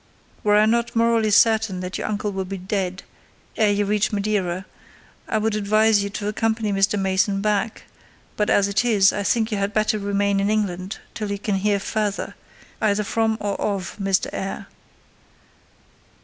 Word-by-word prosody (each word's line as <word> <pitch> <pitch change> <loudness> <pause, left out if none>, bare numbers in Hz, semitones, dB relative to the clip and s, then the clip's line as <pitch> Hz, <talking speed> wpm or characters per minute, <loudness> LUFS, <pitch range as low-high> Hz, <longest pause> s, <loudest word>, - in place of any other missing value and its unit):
Were 210 0 +4
I 210 - +5
not 235 +2 0
morally 230 -1 +3
certain 220 -2 +3
that 180 +1 -5
your - - -3
uncle 210 0 -2
will 190 -1 -3
be 195 +1 -5
dead 185 0 -3 0.5
ere 215 -2 +3
you 205 0 +1
reach 210 0 +1
Madeira, 200 -3 -1 0.6
I - - 0
would 220 0 0
advise 215 0 +3
you 200 - -3
to 205 0 -5
accompany 220 0 0
Mr. 195 +1 +2
Mason 195 +1 +1
back; 210 +1 -1 0.5
but 210 - 0
as 200 -1 +4
it 200 +3 +1
is, 205 -5 +4
I 205 - -2
think 225 +2 +1
you 210 - -1
had 200 +1 -2
better 215 0 +1
remain 200 0 0
in 200 +1 +1
England 195 -2 -2 0.2
till 215 -2 -4
you 200 - -2
can 200 0 -1
hear 200 +1 +1
further, 210 0 -2 0.5
either 210 -1 +2
from 220 +1 0
or 205 -1 -3
of 195 -4 -2
Mr. 195 -1 +1
Eyre. 195 +1 -4
205 Hz, 175 wpm, -22 LUFS, 195-215 Hz, 0.6 s, I